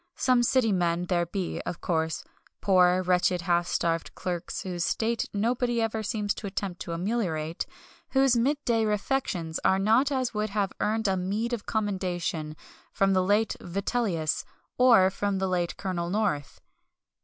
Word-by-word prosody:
Some 255 -2 +3
city 240 -2 +3
men 175 -2 +1
there 175 -1 0
be, 185 0 -3
of 170 - -5
course 160 -2 -1 0.4
poor, 185 -1 +4
wretched, 180 0 +2
half 175 0 +1
starved 165 -1 -1
clerks, 175 -2 -4
whose 180 -2 -3
state 230 +5 0
nobody 240 +3 0
ever 225 -1 -1
seems 210 -2 -1
to 210 - -6
attempt 190 -2 -4
to 170 - -4
ameliorate 170 -4 -2 0.4
whose 270 -2 +4
midday 240 -2 +1
refections 210 -6 -1
are 190 - +4
not 220 +7 +3
such 285 - 0
as 255 -2 -1
would 210 0 -1
have 200 -1 -1
earned 220 +1 0
a 190 - +2
meed 205 +6 -2
of 230 - -4
commendation 180 -7 -2 0.4
from 195 0 +2
the 185 - +3
late 205 +4 +2
Vitellius, 185 -3 -1 0.3
or 230 -7 +6
from 200 0 -1
the 190 0 0
late 175 -2 -1
Colonel 175 -3 -3
North. 190 -8 -1
195 Hz, 155 wpm, -27 LUFS, 175-225 Hz, 0.4 s, or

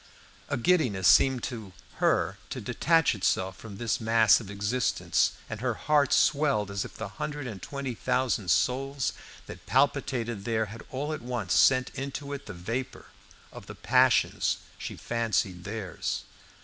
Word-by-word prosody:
A - - 0
giddiness 120 - +2
seemed 130 -3 +5
to 110 -6 -6 0.2
her - - +1
to - - -5
detach 165 -3 +2
itself 95 -2 0
from 105 -3 -10
this 115 +1 -1
mass 115 -1 +5
of 110 -5 -9
existence, 105 +5 0
and 110 0 -6
her 120 -2 0
heart 145 0 +2
swelled 140 -9 +2
as 100 0 -2
if - - -10
the 110 - -4
hundred 145 +9 -5
and 105 -7 -7
twenty 140 +1 -4
thousand 120 -5 0
souls 135 - +1 0.3
that - - -10
palpitated 130 -5 +1
there 110 0 0
had 115 - -9
all 145 +4 -3
at 155 - -5
once 120 -6 -2
sent 130 -1 +4
into 140 +2 -5
it 140 0 -7
the 105 - -6
vapour 115 +9 -5 0.5
of - - -11
the - - -8
passions - - +3 0.2
she - - -6
fancied 110 -6 -1
theirs. 105 -2 -4
120 Hz, 155 wpm, -28 LUFS, 105-135 Hz, 0.5 s, seemed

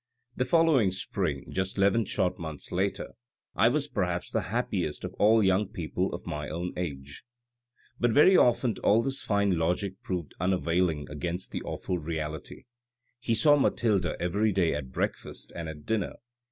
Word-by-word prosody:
The 125 - 0
following 150 - +4
spring, 90 -6 -3
just 95 +1 -2
eleven 100 +3 +3
short 90 -1 -1
months 80 -3 -7
later, 95 +2 -1 0.5
I - - +5
was - - +1
perhaps - - -2
the - - +1
happiest - - -2
of - - -5
all 110 +1 +5
young 95 +1 +3
people 90 -6 -3
of - - -6
my 75 -2 -4
own 85 +4 -4
age." 70 -6 -6 0.8
But 120 - +3
very 150 +11 +6
often 120 -4 +3
all 110 +3 +4
this 135 +1 -2
fine 100 -4 +1
logic 90 +4 -1
proved 90 -5 -4
unavailing 90 -3 +1
against 85 +4 -4
the - - -4
awful 90 - -3
reality. 80 -1 -5 0.6
He 120 -2 0
saw 145 +5 +5
Mathilde 105 -9 +2
every 100 +5 +1
day 90 -4 +2
at 70 -3 -5
breakfast - - -4
and 85 -2 -5
at 75 -2 -9
dinner. 110 -4 -1
95 Hz, 160 wpm, -28 LUFS, 80-110 Hz, 0.8 s, very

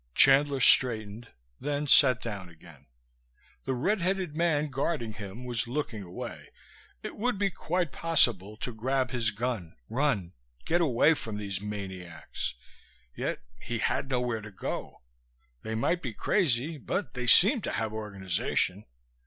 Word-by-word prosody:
Chandler 140 0 +6
straightened, 115 -3 +3 0.3
then 145 +1 -2
sat 130 -3 +5
down 100 -6 -5
again. 80 -5 -17 0.8
The 130 - -1
red 190 - 0
headed 185 -3 -1
man 155 -3 +1
guarding 130 -4 -2
him 105 +3 -8
was 120 -2 -1
looking 125 -4 -3
away. 90 -2 -8 0.5
It - - -6
would 245 +1 0
be 200 0 +1
quite 175 -2 -1
possible 120 - +2
to 120 - -4
grab 130 +3 -1
his 120 -3 +1
gun, 110 -5 -3
run, 115 -9 0 0.3
get 175 +2 +2
away 150 +1 +4
from 110 -8 -5
these 100 -2 -4
maniacs. 95 -9 -5 0.6
Yet - - -3 0.2
he 120 - -3
had 130 +4 -1
nowhere 125 -3 -1
to 105 - -9
go. 95 -9 -6 0.6
They 110 - -4
might 170 +10 +1
be 120 -5 -4
crazy, 155 - +1
but 190 +7 -3
they 125 -1 -4
seemed 210 - +7
to - - -3
have 110 -1 -2
organization. 100 -1 -2
120 Hz, 145 wpm, -29 LUFS, 105-145 Hz, 0.8 s, seemed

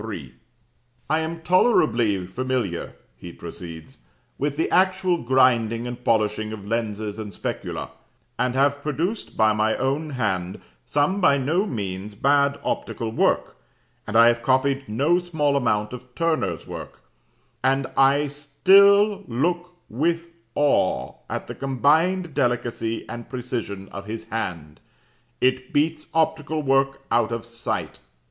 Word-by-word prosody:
3: 85 - -7 0.8
"'I 155 - +3
am 165 +1 -4
tolerably 120 - +3
familiar,' 120 -3 -3 0.2
he 85 +6 -9
proceeds, 85 -1 -10 0.4
'with 145 0 -1
the 160 - +1
actual 185 -2 +2
grinding 120 -2 +3
and 120 0 -6
polishing 110 -1 +1
of 105 -2 -7
lenses 110 -1 -3
and 105 -2 -6
specula, - - -5 0.5
and 125 0 0
have 140 +1 +2
produced 165 - -3
by 110 -1 +4
my 110 +1 +1
own 140 +4 -1
hand 95 -6 -1 0.3
some 150 +8 +1
by 140 -5 +5
no 160 +10 +1
means 100 - -5
bad 140 +3 +2
optical 115 -2 -3
work, - - +1 0.5
and 110 +1 +1
I 115 - +8
have 120 0 +3
copied 135 +1 +1
no 145 +11 +2
small 160 -5 0
amount 105 -4 0
of 125 0 -10
Turner's 165 -1 -1
work, - - -9 0.6
and 135 +1 +2
I 140 +2 +4
still 195 +8 +4
look 175 +8 -1 0.2
with 165 +7 -1 0.3
awe 145 -10 +1 0.2
at - - -3
the - - -7
combined 155 +6 +1
delicacy 120 -2 -1
and 120 -1 -8
precision 120 -6 -4
of 100 +1 -8
his 110 +1 -5
hand; 85 -9 -4 0.6
IT 130 0 +1
BEATS 155 +1 0
OPTICAL 155 -1 0
WORK 135 0 +2
OUT 120 -1 +2
OF 115 0 -3
SIGHT. 115 - -4
130 Hz, 135 wpm, -24 LUFS, 110-155 Hz, 0.8 s, I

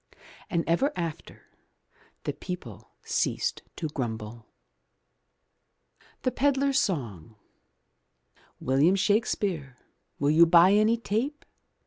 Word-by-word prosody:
And 170 -2 0
ever 175 - +2
after 165 -2 -6 0.8
the - - -2
people 175 - -8
ceased - - -1
to 160 - -3
grumble. 115 -4 -5 1.8
THE 255 - +1
PEDLAR'S 275 0 +2
SONG 110 - -3 1.2
William 140 +8 +3
Shakespeare 195 - 0 0.4
Will 145 +1 +1
you 165 +2 +6
buy 175 +3 +6
any 215 +3 +4
tape. 235 +7 -3
170 Hz, 90 wpm, -27 LUFS, 135-215 Hz, 1.8 s, you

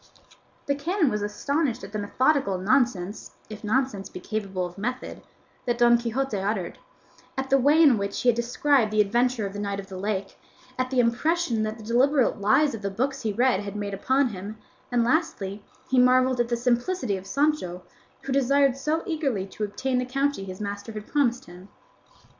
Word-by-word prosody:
The 280 - +1
canon 315 +1 0
was 210 - -1
astonished 250 +5 -1
at - - -8
the 215 - -3
methodical 255 0 +1
nonsense 210 -2 0 0.2
(if 210 0 -8
nonsense 215 -3 -1
be - - -8
capable 195 -2 -3
of 175 0 -8
method) 250 +5 -4 0.5
that 240 -1 +1
Don 240 0 +6
Quixote 235 0 -2
uttered, 195 -2 -2 0.6
at 265 0 -3
the 275 - +5
way 290 +5 +4
in 265 -8 +5
which 200 0 -3
he 250 - +4
had 235 - +3
described 245 0 +2
the 215 - 0
adventure 235 +2 +2
of 195 - -5
the 205 - -5
knight 200 -1 -3
of 195 - -9
the 190 -1 -7
lake, 200 -1 -3 0.4
at 255 0 -1
the 260 -1 0
impression 245 +1 +1
that 215 +1 -2
the 220 - -11
deliberate 250 +1 +2
lies 280 +8 +3
of 225 - -6
the 200 - -2
books 265 +7 -2
he 220 -3 -1
read 245 0 +2
had 205 0 -6
made 205 -1 -4
upon 260 +7 +1
him, 205 +1 -7 0.3
and 240 -1 +3
lastly 215 - -1 0.2
he 260 - +3
marvelled 255 0 +4
at 240 -1 +1
the 240 - 0
simplicity 245 - 0
of 190 0 -8
Sancho, 275 - 0 0.4
who 270 - -5
desired 275 0 +3
so 305 +4 -1
eagerly 275 - -1
to 200 +2 -7
obtain 250 +5 -1
the 250 - -1
county 275 -3 -1
his 185 -1 -8
master 205 +1 -5
had 210 -1 -7
promised 260 -2 0
him. 180 +3 -13
235 Hz, 195 wpm, -25 LUFS, 205-270 Hz, 0.6 s, Don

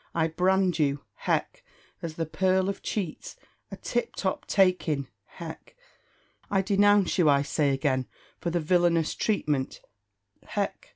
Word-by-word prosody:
I 165 -1 +2
brand 180 +1 +2
you 140 -2 +1 0.2
(hech!) - - 0 0.4
as 165 -3 -5
the 165 - -2
pearl 185 +4 +1
of 200 - -4
cheats, 185 -7 -4 0.3
a - - -8
tip 240 0 -2
top 190 -2 -2
take 185 -3 +3
in 140 -3 -1 0.3
(hech!). - - -9 0.7
I 195 -1 +2
denounce 205 -1 +3
you, 160 -4 +5
I 140 0 +4
say 145 0 +1
again, 135 -2 0 0.3
for 170 - -2
the 175 +1 0
villainous 170 0 +2
treatment 150 -11 -1 0.6
(hech!) - - -3
175 Hz, 140 wpm, -27 LUFS, 150-190 Hz, 0.7 s, you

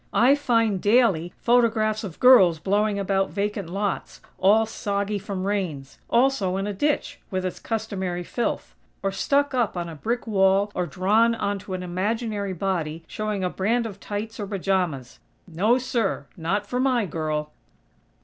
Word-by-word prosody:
I 250 +4 +6
find, 230 -8 +1
daily, 205 -7 +3
photographs 225 -2 +2
of 185 -6 -7
girls 195 -10 +7
blowing 205 +5 +1
about 195 -1 0
vacant 200 -3 -3
lots, 200 +2 -3 0.2
all 210 +4 +5
soggy 205 -1 -2
from 195 -1 -4
rains; 175 -10 -3
also 235 -7 +2
in 195 - -2
a 205 - -3
ditch, 290 +9 -1
with 185 -2 -2
its 185 - -4
customary 190 -6 -3
filth; 235 +7 -3 0.3
or 195 - +1
stuck 280 +8 +1
up 235 -7 0
on 170 -1 -3
a 165 - -7
brick 235 +10 -2
wall 195 -1 +3
or 180 - -1
drawn 215 +8 +2
onto 200 -3 -3
an 180 - -5
imaginary 200 +2 -2
body 165 -3 -2
showing 210 +1 -3
a 180 - +1
brand 230 +5 0
of 200 -3 -7
tights 215 +3 -5
or 205 - -3
pajamas. 180 - -2 0.3
No, 200 +8 +2
sir!! 245 -5 -1
Not 195 +5 -1
for 250 +5 -3
my 255 -4 +2
girl!!" 155 -3 -3
200 Hz, 160 wpm, -24 LUFS, 185-225 Hz, 0.3 s, girls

